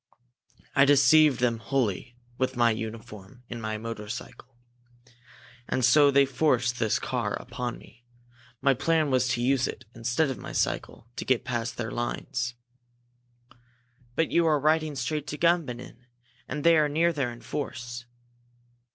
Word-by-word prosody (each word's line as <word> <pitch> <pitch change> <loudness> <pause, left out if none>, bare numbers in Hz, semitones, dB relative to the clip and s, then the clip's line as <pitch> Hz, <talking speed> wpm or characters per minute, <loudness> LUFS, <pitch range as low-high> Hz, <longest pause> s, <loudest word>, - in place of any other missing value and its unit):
I 140 - +6
deceived 145 +1 +5
them 120 -2 +1
wholly, 120 -1 -2 0.2
with 130 0 0
my 120 -1 +4
uniform, 110 0 -7
and 120 -1 -5
my 110 0 -3
motorcycle. 115 +3 -8 1.1
And 130 - +1
so 145 +3 +6
they 140 0 +5
forced 125 -3 +1
this 110 - +2
car 120 -5 -2
upon 120 -1 -5
me! 120 - -18 0.6
My 140 -1 +5
plan 155 +2 +1
was 130 -1 +2
to 120 -2 0
use 130 0 +2
it, 120 - -7
instead 125 +5 0
of 130 - -6
my - - -8
cycle, 115 - -2
to - - -3
get 125 -2 +1
past 120 -2 -3
their 115 -1 -3
lines." 120 0 -3 1.6
"But 165 - +1
you 170 -1 +3
are 150 -2 +3
riding 155 +1 +1
straight 150 +3 -3
to 150 - -5
Gumbinnen 140 -8 0 0.4
and 150 -1 -4
they 170 -1 +6
are 150 -1 +3
near 165 +3 +2
there 135 -5 -1
in 120 - -11
force!" 120 -3 -5
125 Hz, 150 wpm, -27 LUFS, 120-145 Hz, 1.6 s, I